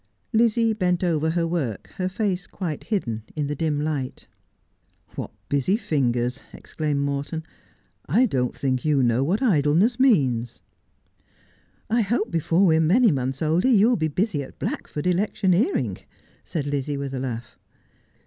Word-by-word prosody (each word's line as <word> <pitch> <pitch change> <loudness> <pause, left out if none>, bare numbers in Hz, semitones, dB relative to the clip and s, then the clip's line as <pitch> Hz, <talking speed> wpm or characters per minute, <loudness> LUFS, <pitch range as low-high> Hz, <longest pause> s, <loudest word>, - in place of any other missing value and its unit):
Lizzie 230 0 +3
bent 180 -4 0
over 160 -3 +1
her 165 +1 0
work, 160 - -3
her 185 0 -1
face 190 -2 -2
quite 165 -6 -5
hidden 120 - -2
in 150 -2 -1
the 145 - -2
dim 150 0 -1
light. 145 -4 -3 0.4
' - - -32
What - - -4 0.2
busy 145 +9 +1
fingers! 130 - 0
' - - -27
exclaimed 150 -3 -3
Morton. 140 +3 -2 0.4
' - - -34
I 255 - +6
don't 130 - -1
think 130 -2 -1
you 145 -4 +2
know 120 +2 +2
what 190 - 0
idleness 185 - +3
means.' 130 - +2 0.6
' - - -36 0.5
I 235 +1 +3
hope 225 +2 0
before 170 +3 +2
we 160 -3 +4
are - - +3
many 205 +8 +4
months 135 +1 -2
older 165 +10 +2
you 220 -2 +5
will 250 - +3
be 160 -5 0
busy 170 0 -1
at 135 - -10
Blackford 150 - -4
electioneering,' 190 - +1 0.4
said 155 -5 -3
Lizzie, 145 0 -2
with 140 -1 -4
a 130 - -3
laugh. 120 -3 -5
160 Hz, 165 wpm, -24 LUFS, 140-195 Hz, 0.6 s, I